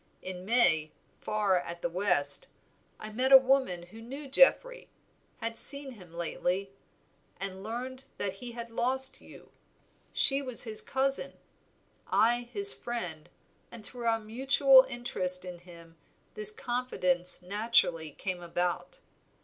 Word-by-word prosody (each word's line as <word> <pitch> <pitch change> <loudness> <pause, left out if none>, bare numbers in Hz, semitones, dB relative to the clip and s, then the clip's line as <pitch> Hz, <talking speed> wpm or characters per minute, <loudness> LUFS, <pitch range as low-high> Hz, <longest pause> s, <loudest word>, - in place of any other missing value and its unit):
In 185 0 -8
May, 160 -9 +2 0.3
far 205 -4 -1
at 170 0 -9
the - - 0
West, 175 -5 0 0.5
I 215 - -9
met 255 +5 -1
a 270 - +11
woman 260 -9 0
who 215 +6 -15
knew 275 +5 -10
Geoffrey; - - +1 0.5
had 230 0 0
seen 280 -1 +3
him 185 -8 -15
lately, 180 +3 -4 0.7
and 190 -1 -3
learned 255 +5 -7
that 195 -2 -4
he 245 -1 -8
had 235 0 -9
lost 260 +3 +2
you. - - -17 0.6
She 275 -1 +1
was 255 -4 +3
his 220 -3 +1
cousin, 270 +1 -2 0.7
I 240 +1 0
his 405 0 +10
friend, 180 -11 -7 0.4
and 225 -3 -11
through 240 +2 -6
our 225 0 +1
mutual 265 +4 +3
interest 185 -7 -1
in 180 -1 -9
him 170 -2 -17 0.4
this 210 -1 +3
confidence 185 -8 -1
naturally 180 -5 0
came 180 +4 -7
about. 175 - -4
220 Hz, 135 wpm, -28 LUFS, 180-255 Hz, 0.7 s, a